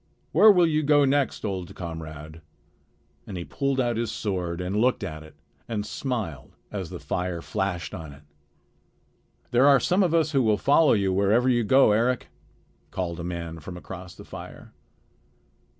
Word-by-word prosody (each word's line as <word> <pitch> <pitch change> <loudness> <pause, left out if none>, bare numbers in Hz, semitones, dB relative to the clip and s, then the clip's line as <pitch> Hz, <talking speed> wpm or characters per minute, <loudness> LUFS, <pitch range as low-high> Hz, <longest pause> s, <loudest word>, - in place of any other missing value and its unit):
Where 210 +7 +8
will 180 -3 +5
you 155 -2 +1
go 145 -1 +4
next, 140 -3 0
old 95 -4 -4
comrade?" 80 -2 -8 0.9
and 95 - -6
he 85 - -5
pulled 140 -1 -1
out 120 -3 +1
his 115 -1 -1
sword 90 -4 -3
and 90 +2 -3
looked 125 +1 +2
at 80 0 -5
it 80 0 -14 0.3
and 105 -3 -3
smiled 110 - -4 0.2
as - - -5
the - - -6
fire 90 -1 -3
flashed 90 -2 -3
on 80 -3 -7
it. 70 +1 -15 1.3
"There 125 +3 +5
are 140 -2 +7
some 180 - +2
of 175 -3 +2
us 160 -2 +2
who 135 -3 +3
will 110 -3 +3
follow 145 +7 +4
you 100 -3 +1
wherever 100 +6 +3
you 120 -2 +3
go, 130 +1 +5
Eric," 120 +4 +1 0.6
called 85 -2 -4
a - - -5
man 85 -2 -5
from 90 +4 -8
across 90 0 -9
the - - -12
fire. - - -10
105 Hz, 170 wpm, -25 LUFS, 85-135 Hz, 1.3 s, Where